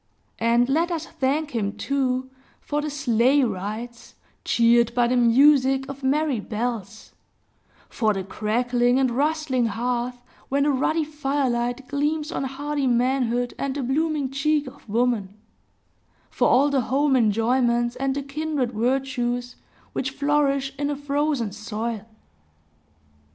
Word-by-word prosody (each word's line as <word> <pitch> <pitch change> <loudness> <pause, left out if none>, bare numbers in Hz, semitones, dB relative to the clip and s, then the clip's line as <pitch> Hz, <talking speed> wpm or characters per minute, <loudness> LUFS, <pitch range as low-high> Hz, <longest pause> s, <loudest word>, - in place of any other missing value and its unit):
And 235 +1 +3
let 325 +6 +1
us 330 -2 -3
thank 295 +1 -1
him, 210 -5 -2
too, 260 -1 -1 0.3
for 295 0 -2
the 300 - -3
sleigh 270 0 +2
rides, 225 +2 -5 0.3
cheered 235 0 +3
by 245 -1 +3
the 245 +1 +1
music 265 +2 +4
of 275 0 -8
merry 280 -1 +1
bells; 220 -1 -4 0.8
for 220 -3 0
the 195 -2 -2
crackling 245 +5 +1
and 265 -2 +2
rustling 280 -2 0
hearth, 245 +3 -2 0.3
when 280 +1 +2
the 295 - +3
ruddy 310 +4 +1
firelight 270 -4 -1
gleams 295 +2 -1
on 275 - -2
hardy 280 +1 -2
Manhood 245 0 +1
and 275 -1 -2
the 285 - -2
blooming 290 +1 0
cheek 295 +2 +1
of 255 -4 -13
Woman; 215 -3 0 0.9
for - - +2
all 280 +3 +4
the 275 -2 +2
home 270 +4 +1
enjoyments, 240 +1 +2
and 270 +1 -1
the 280 - -3
kindred 280 -2 -2
virtues, 245 0 -1 0.4
which 270 - -1
flourish 280 -1 0
in 285 0 0
a 290 - -1
frozen 285 -5 -1
soil. 215 +1 -5
260 Hz, 135 wpm, -24 LUFS, 235-285 Hz, 0.9 s, music